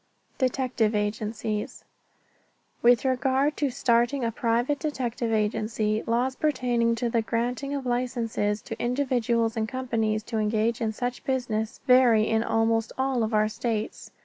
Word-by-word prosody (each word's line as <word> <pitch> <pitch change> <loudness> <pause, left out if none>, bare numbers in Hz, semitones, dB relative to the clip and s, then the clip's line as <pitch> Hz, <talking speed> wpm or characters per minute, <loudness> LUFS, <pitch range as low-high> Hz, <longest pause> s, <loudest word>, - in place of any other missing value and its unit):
DETECTIVE 255 -4 +1
AGENCIES 210 0 -3 1.0
With 240 +1 +4
regard 265 +3 +1
to 285 - +1
starting 240 +2 +1
a 230 - 0
private 240 +5 0
detective 250 -6 -2
agency, 215 0 0
laws 245 +3 +1
pertaining 245 -6 +1
to 235 +1 -1
the 230 - +2
granting 245 +5 -2
of 275 -2 -4
licenses 240 -4 -1
to - - -7
individuals 240 -3 0
and 220 -1 -1
companies 225 -4 -1
to 225 0 -3
engage 220 +2 0
in 220 -1 0
such 245 +2 -4
business 230 -5 -2
vary 245 -4 +5
in 220 0 +2
almost 225 0 +1
all 265 -2 0
of 220 0 0
our 215 -1 +3
states. 215 0 -3
235 Hz, 140 wpm, -26 LUFS, 220-255 Hz, 1.0 s, vary